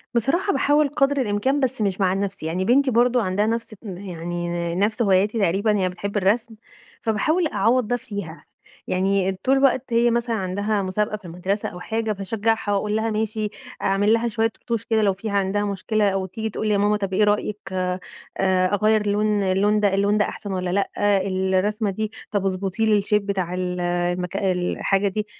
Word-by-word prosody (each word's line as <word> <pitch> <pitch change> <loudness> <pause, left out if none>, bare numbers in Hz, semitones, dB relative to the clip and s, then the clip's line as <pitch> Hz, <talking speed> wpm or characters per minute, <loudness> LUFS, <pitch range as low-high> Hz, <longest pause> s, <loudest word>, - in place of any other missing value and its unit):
بصراحة 340 - +1
باحاول 290 +1 +3
قدر 280 -1 +1
الإمكان 250 +6 0
بس 260 -3 -1
مش 195 -1 0
مع 185 -1 +3
نفسي، 195 -4 -3
يعني 180 +4 -1
بنتي 265 +2 +3
برضه 245 +1 +3
عندها 195 +2 0
نفس 230 0 -2
يعني 175 -3 -4
نفس 210 +5 0
هواياتي 205 +2 +2
تقريبًا، 200 +3 +2
هي 185 -1 +1
بتحب 200 +3 -4
الرسم، 220 +4 +1 0.5
فباحاول 310 - +1
أعوَّض 230 0 +1
ده 245 - +1
فيها. 200 -9 -7 0.4
يعني 190 +1 +1
طول 270 +1 +3
الوقت 260 -2 +2
هي 235 0 +4
مثلًا 235 -1 0
عندها 200 +2 -1
مسابقة 210 +3 -1
في 205 - -19
المدرسة 180 +4 -2
أو 180 - -10
حاجة 220 +2 -2
فاشجعها 215 +2 -1
وأقول 210 +1 0
لها 225 +1 0
ماشي، 215 0 -1 0.3
أعمل 205 +3 +2
لها 230 +1 +1
شوية 225 0 0
رطوش 230 -2 -3
كده 220 -1 +1
لو 200 -2 +3
فيه 200 +2 -5
عندها 200 +1 0
مشكلة 205 +1 0
أو 190 -1 -1
تيجي 220 +4 -4
تقول 215 +1 -3
لي 210 - +2
يا - - +3
ماما 205 +1 +2
طب 195 -2 -3
إيه 210 - +3
رأيِِك 210 0 +1 0.2
آآ 185 0 -1 0.7
أغيّر 215 +1 +3
اللون 210 0 +1
اللون 200 +3 +2
ده 200 -2 +2
اللون 200 +2 +2
ده 210 - +3
أحسن 205 - -6
والّا 180 -1 -2
لأ؟ 195 +2 0 0.4
الرسمة 190 +3 0
دي، 215 +2 -3 0.2
طب 200 -2 0
اضبطي 195 +3 -1
لي 210 -2 +3
الshape 210 - -4
بتاع 190 -3 -2
ال 180 0 -2
المك 175 +1 -1
الحاجة 195 +1 0
دي. 210 +2 -2
205 Hz, 185 wpm, -23 LUFS, 190-220 Hz, 0.7 s, هي